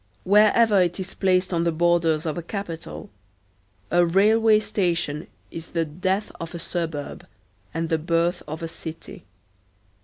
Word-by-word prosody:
Wherever 210 +1 +5
it 175 +1 0
is 190 0 -5
placed 185 -1 +1
on 170 -1 +1
the 170 - +1
borders 165 -1 +2
of 155 - -2
a 175 - -4
capital, 170 - -7 0.8
a 175 0 +5
railway 215 +5 +4
station 170 -7 -1 0.2
is 165 0 -7
the 165 -1 -1
death 185 +7 -2
of 165 +1 -6
a - - -3
suburb 165 -4 -5 0.4
and 165 +7 -2
the 160 - +1
birth 170 +2 0
of 155 +2 -6
a - - -2
city. 160 -7 -9
170 Hz, 150 wpm, -24 LUFS, 165-190 Hz, 0.8 s, Wherever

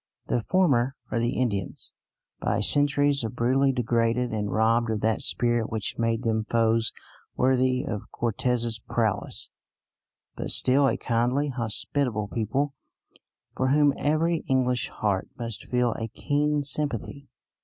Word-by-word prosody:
The 120 - 0
former 135 -5 +2 0.2
are 115 - 0
the 120 +2 0
Indians, 100 -7 -2 0.5
by 100 - 0
centuries 145 +3 +2
of 115 +1 -4
brutality 130 +3 +2
degraded 120 0 +1
and 105 -2 -2
robbed 115 +1 +2
of 110 -2 -1
that 110 0 +1
spirit 120 -2 +1
which 110 0 -3
made 115 0 0
them 110 -2 0
foes 115 0 +1 0.4
worthy 130 0 +2
of 105 -4 -5
Cortes's 120 0 -1
prowess, 110 -1 -2 0.8
but - - -4
still 135 +2 +4
a - - +1
kindly, 125 +5 0
hospitable 115 -2 -1
people 135 +6 -1 0.8
for 130 - 0
whom 145 +1 +4
every 160 +3 +1
English 125 -3 +1
heart 100 -3 -1
must 115 -4 -5
feel 125 -1 +1
a 115 - -4
keen 145 +5 0
sympathy. 140 -1 -4
120 Hz, 135 wpm, -26 LUFS, 115-135 Hz, 0.8 s, still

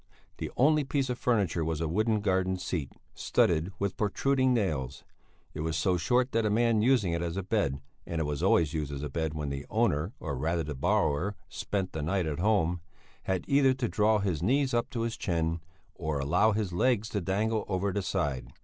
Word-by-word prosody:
The - - -3
only 150 +3 +4
piece 135 -2 -1
of 120 - -4
furniture 100 -9 +1
was 80 -1 -2
a 80 - -1
wooden 110 +5 +1
garden 95 -2 +1
seat, 85 -6 -3 0.2
studded 85 +2 +1
with 100 -1 -2
protruding 130 +5 +1
nails. 75 - -1 0.5
It - - -7
was 80 0 -1
so 90 +3 +2
short 125 +9 +1
that 115 - +1
a 105 - +1
man 115 0 +3
using 115 -7 +3
it 85 - -1
as 85 +1 -3
a 95 - -2
bed 90 -10 0 0.3
and 85 - -2
it - - +1
was 75 -1 -3
always 80 -2 +3
used 75 -3 -2
as 70 0 -5
a 75 - -3
bed 80 0 -2
when 75 -2 -3
the 70 +1 -5
owner, 100 -5 +1
or 75 -4 -4
rather 80 +5 -1
the 75 0 -4
borrower, 75 +7 +1
spent 95 +6 -3
the 80 - -3
night 90 +4 0
at 75 -1 -3
home 90 -4 +2 0.4
had 95 -2 -1
either 140 -2 +4
to 130 -2 -1
draw 110 0 +3
his 95 -6 -1
knees 130 +7 +2
up 120 0 +1
to 115 - -3
his 115 0 -2
chin, 85 -2 -1 0.3
or 80 -2 -3
allow 90 +11 +3
his 105 -4 -2
legs 110 +3 +2
to 105 - -2
dangle 105 +4 0
over 95 0 -1
the 100 - 0
side. 70 -8 -2
95 Hz, 210 wpm, -29 LUFS, 80-110 Hz, 0.5 s, only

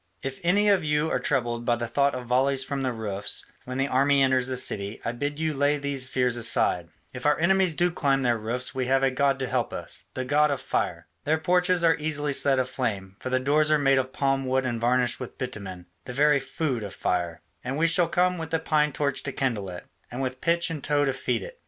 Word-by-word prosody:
If 135 0 -5
any 200 +5 +2
of 195 -4 +4
you 150 +1 0
are - - +1
troubled 120 -4 -1
by 120 0 +2
the 120 0 -3
thought 140 +4 +1
of 125 -1 -6
volleys 130 +2 +2
from 140 +1 -3
the 130 -1 0
roofs 105 -3 -3 0.2
when 130 +1 -5
the 135 +1 +1
army 140 +1 +3
enters 130 -1 +2
the 130 -1 -1
city, 100 -3 -1
I 115 - 0
bid 145 +5 -4
you 160 -1 0
lay 145 +1 +2
these 140 -2 -1
fears 125 -2 +1
aside: 90 -7 +2 0.2
if 125 +3 -3
our 150 - +3
enemies 185 0 +2
do 175 +2 +2
climb 135 -5 +1
their 120 -2 +1
roofs 120 +4 -2
we 130 -1 -2
have 135 +1 +2
a 135 - +3
god 135 +1 +1
to 135 -1 -3
help - - -1
us, - - -6
the 130 - -3
god 150 +3 +3
of 140 - -1
Fire. - - -2 0.2
Their 155 +2 +1
porches 180 +1 +2
are 165 -1 +4
easily 150 -1 -2
set 135 0 +3
aflame, 110 -7 -2
for - - -5
the 130 0 +1
doors 150 +4 +2
are 155 - +4
made 135 -2 +3
of 130 0 -3
palm 135 -1 0
wood 130 0 +1
and 120 -2 -2
varnished 125 0 +2
with 125 - -8
bitumen, 100 -8 -6 0.2
the 125 - -6
very 145 +2 +4
food 135 -2 -3
of 100 -2 -7
fire. 85 -2 -2 0.2
And 130 +3 -3
we 165 - +2
shall 170 +1 +3
come 180 +1 +1
with 160 -1 -5
the 165 - +1
pine 150 -2 +1
torch 140 -1 -1
to 135 - -4
kindle 115 -8 -2
it, 90 -1 -8 0.2
and 120 - -6
with 130 -1 -3
pitch 170 0 +1
and 155 -4 -5
tow 145 0 +2
to 135 - 0
feed 130 - -2
it. - - -10
135 Hz, 240 wpm, -26 LUFS, 125-150 Hz, 0.2 s, of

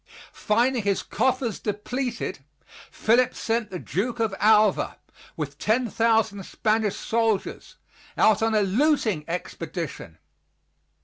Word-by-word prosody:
Finding 240 +3 +1
his 200 -1 0
coffers 255 -2 -1
depleted, 230 - -3 0.5
Philip 240 +3 +2
sent 225 -1 -1
the 185 - -5
Duke 230 +8 -3
of 220 -3 0
Alva, 215 -2 +3 0.4
with 145 -2 -5
10,000 225 -2 +1
Spanish 215 +1 0
soldiers, 225 -3 -1 0.4
out 215 -1 +4
on 225 0 +1
a 210 - +4
looting 220 - +1
expedition. 165 - -5
220 Hz, 105 wpm, -25 LUFS, 195-230 Hz, 0.5 s, out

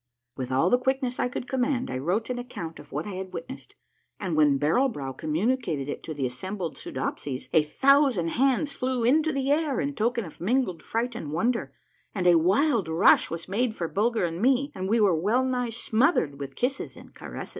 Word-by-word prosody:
With 130 -1 -5
all 135 +8 +2
the 245 - +4
quickness 260 -1 -1
I - - +2
could 245 0 -5
command, 260 0 0
1 130 - -3
wrote 200 - -1
an 245 - -3
account 170 -10 -7
of - - -14
what - - -3
I 205 - -5
had 190 0 -6
witnessed, 170 +11 -8 0.4
and 185 -5 -2
when 150 -2 +4
Barrel 165 - +2
Brow 140 - -5
communicated 160 - -1
it 145 - -4
to 155 - -6
the 140 -2 -1
assembled 170 +8 -4
Soodopsies, 130 0 -5
a 160 - +6
thousand 265 - +3
hands 275 - +1
flew 255 -2 -1
into 310 +6 +3
the 275 -1 0
air, 300 -2 +1
in 285 - -1
token 235 -2 0
of 160 - -12
mingled 220 -2 0
fright 235 +2 -2
and 150 -11 -5
wonder, 230 +9 0 0.4
and 185 -3 -1
a 175 -2 +6
wild 205 - +2
rush 160 +2 +4
was 165 0 -5
made 220 +3 0
for 170 - -2
Bulger 220 +2 +1
and 170 +2 -4
me, 270 +3 +2
and 190 +1 -4
we 230 +2 +3
were 205 -4 +4
well 210 +11 +1
nigh 250 -2 -1
smothered 225 - +1
with 135 -1 -7
kisses 265 +2 -2
and - - -14
caresses. - - -8
220 Hz, 205 wpm, -26 LUFS, 165-255 Hz, 0.4 s, a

